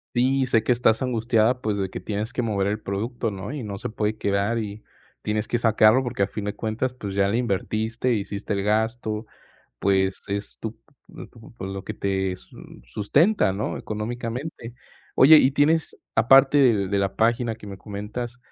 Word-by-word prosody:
Sí, 130 +2 +2
sé 115 -3 +2
que 120 - +1
estás 115 -2 +3
angustiada, 120 0 +1
pues, 105 -2 -1
de 95 -1 -2
que - - -6
tienes 110 +3 -4
que 125 - -1
mover 100 -4 0
el 105 +1 -1
producto, 115 +4 -3
¿no? 100 +2 -6
y 145 - -4
no 100 -2 -5
se - - -5
puede 110 0 -2
quedar 100 +3 0
y 105 -1 -5 0.4
tienes 105 0 -2
que 120 - 0
sacarlo 110 +1 +5
porque, 115 -5 -1
a - - +1
fin 105 - -6
de 105 0 -3
cuentas, 115 +3 -2
pues 100 -6 -6
ya 100 0 +2
le 110 +4 0
invertiste, 115 +2 -1
hiciste 100 0 -3
el 100 - -1
gasto. 110 +1 -1 0.5
Pues 95 -1 +1
es 100 +1 -5
tu 110 0 -6 0.5
tu 115 -1 -16
lo 95 0 -5
que 110 - -5
te 95 -2 -1
su - - -19 0.3
sustenta, 105 - +2
¿no? 100 +3 -3
económicamente. 115 +3 -5 0.4
Oye, 155 +4 +8
¿y 135 -1 +4
tienes, 150 +3 +2 0.2
aparte 135 +4 +6
de 110 -8 +4
de 100 0 0
la 100 0 -1
página 115 0 +1
que 105 -2 -13
me 100 -1 -8
comentas 105 +5 -6
110 Hz, 185 wpm, -24 LUFS, 100-120 Hz, 0.5 s, Oye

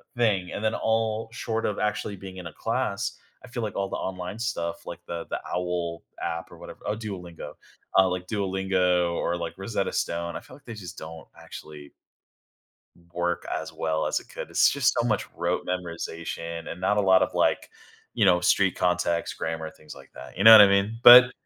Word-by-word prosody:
thing, 105 -7 +1
and 105 - -5
then 110 - +1
all 110 0 0
short 115 -2 -2
of 105 - -1
actually 105 -1 -2
being 95 0 -10
in 90 -2 -7
a 80 - -10
class, 120 - -2 0.3
I - - -11
feel 120 0 -4
like 105 - -4
all 100 -1 -1
the - - -3
online 95 +3 -5
stuff, 85 -8 -3
like 85 - -7
the 85 -1 -5
the - - -2
owl 90 -2 -2 0.2
app 85 0 -4
or - - -14
whatever - - -11
Oh, 105 - -1
Duolingo, 90 -8 -7 0.4
uh, 95 -1 +6
like 90 0 -3
Duolingo 95 -3 +1
or, 85 - -1
like, 85 -1 -5
Rosetta 100 0 -2
Stone, 85 0 -2
I - - -6
feel - - -14
like 140 - -20
they 115 - -7
just 90 -4 -9
don't 80 0 -9
actually 75 -2 -11 1.2
work 85 0 -1
as - - -4
well 80 -1 -1
as - - 0
it - - -17
could, - - -7
it's - - +4
just 140 -2 +2
so 120 - +1
much 110 -3 0
rote 85 +1 -1
memorization 85 -2 -5
and 90 - -7
not 105 +2 +2
a - - +4
lot 95 -1 +5
of, - - 0
like, - - +1 0.4
you 110 - +2
know, 90 -2 +4
street 95 0 +3
context, 90 -1 0
grammar, 80 -1 -3
things 75 -1 -13
like 70 -1 -15
that, - - -11
you 95 - 0
know 110 - +11
what 110 - +12
I 100 - +9
mean? 100 +3 +1
But 125 +1 +11
95 Hz, 205 wpm, -26 LUFS, 85-105 Hz, 1.2 s, what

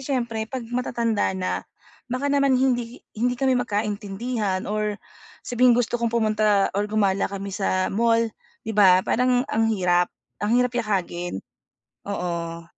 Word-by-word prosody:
siyempre 235 -5 -2
'pag 255 -3 -5
matatanda 230 -5 0
na, 185 -1 -3 0.4
baka 275 +3 -1
naman 275 -2 +3
hindi 245 -2 -1
hindi 245 +2 0
kami 265 +1 +2
magkaintindihan 210 -1 -2
or 210 0 -2 0.5
sabihing 245 0 +4
gusto 240 0 0
kong 235 - +1
pumunta 215 -3 +2
or 205 +2 -1
gumala 200 -2 +1
kami 200 0 -6
sa 185 -1 0
mall 230 +2 +3 0.4
'di 220 - -3
ba 190 -3 +6
parang 250 +1 +2
ang 225 0 +2
hirap 180 -4 +2 0.3
ang 210 +3 +2
hirap 250 0 +2
yakagin, 180 - -2 0.6
oo. 170 -3 -3
220 Hz, 135 wpm, -24 LUFS, 195-245 Hz, 0.6 s, ba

